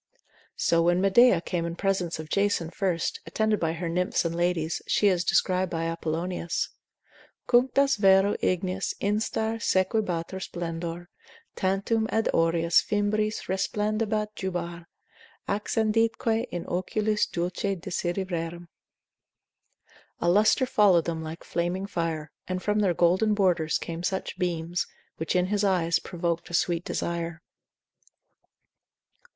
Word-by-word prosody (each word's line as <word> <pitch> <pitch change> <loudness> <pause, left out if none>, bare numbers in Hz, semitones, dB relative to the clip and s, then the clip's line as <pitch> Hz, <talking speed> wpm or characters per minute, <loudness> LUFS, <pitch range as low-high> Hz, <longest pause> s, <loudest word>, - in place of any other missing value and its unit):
So 170 0 +2
when 175 +1 +3
Medea 195 0 +5
came 175 -1 -2
in 170 0 -3
presence 185 -3 -1
of 155 0 -7
Jason 200 -2 0
first, 180 -3 -1
attended 220 -1 +1
by 165 -1 0
her 170 +1 -4
nymphs 180 +1 0
and 165 - -1
ladies, 175 -2 0
as - - -7
she 205 - +4
is 180 -2 +1
described 185 0 +2
by 165 -1 -2
Apollonius, 165 +1 -2 0.8
Cunctas 265 +2 +3
vero 195 0 +5
ignis 185 +1 -1
instar 220 +2 -1
sequebatur 185 -3 0
splendor, 170 -1 -5 0.5
Tantum 200 +4 0
ab 225 0 +1
aureis 165 +1 +3
fimbriis 215 +1 -1
resplendebat 210 +2 -1
jubar, 175 -3 -4 0.6
Accenditque 225 +2 +1
in 175 -1 -5
oculis 210 +4 0
dulce 180 +3 -2
desiderium. 175 -1 -3 1.5
A - - -1
lustre 210 +8 +4
followed 195 -8 +4
them 165 -1 -3
like 160 +1 -7
flaming 175 +3 -2
fire, 165 -5 -3 0.2
And 185 0 -3
from 210 0 +1
their 190 -4 +2
golden 190 +6 +3
borders 175 -5 +2
came 165 0 -6
such 190 0 -3
beams, 175 -1 -1 0.3
Which 160 +2 -2
in 180 0 +3
his 205 +2 0
eyes 175 -4 +2
provok'd 170 -2 -3
a 170 - -2
sweet 170 0 +1
desire. 170 -1 -3
180 Hz, 125 wpm, -27 LUFS, 170-205 Hz, 1.5 s, Medea